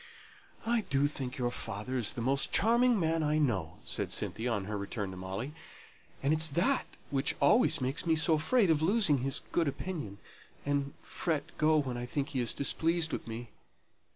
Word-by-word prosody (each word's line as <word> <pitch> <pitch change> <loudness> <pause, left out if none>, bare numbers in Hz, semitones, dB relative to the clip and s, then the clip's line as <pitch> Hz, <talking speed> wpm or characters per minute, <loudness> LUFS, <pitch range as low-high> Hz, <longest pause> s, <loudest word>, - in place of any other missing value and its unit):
"I 235 0 +2
do 140 0 +2
think 135 -2 -3
your 120 -2 -1
father 110 +2 -4
is 120 -5 +1
the 115 - -4
most 135 +2 +1
charming 235 +1 +4
man 165 -1 +1
I 150 0 +1
know," 100 - -1
said - - -3
Cynthia, 120 +2 -1
on 100 -4 -1
her 105 +1 -4
return 100 0 -4
to - - -8
Molly; 95 +10 -5 0.7
"and 140 +3 +3
it's 160 0 +5
that 175 - +1 0.2
which 135 0 +1
always 210 - +4
makes 135 +6 -2
me 160 - +4
so 160 +1 +3
afraid 185 +5 +3
of 155 -1 +2
losing 180 - +3
his 135 +2 -1
good 165 -3 +1
opinion, 140 - -5 0.5
and 140 +1 -1
fret 160 -4 -3
so 155 0 +4
when 130 -5 -1
I 120 0 -5
think 140 +2 -2
he 135 - -2
is 120 -2 +2
displeased 160 +3 +2
with - - -4
me. 115 0 -7
140 Hz, 185 wpm, -31 LUFS, 120-160 Hz, 0.7 s, it's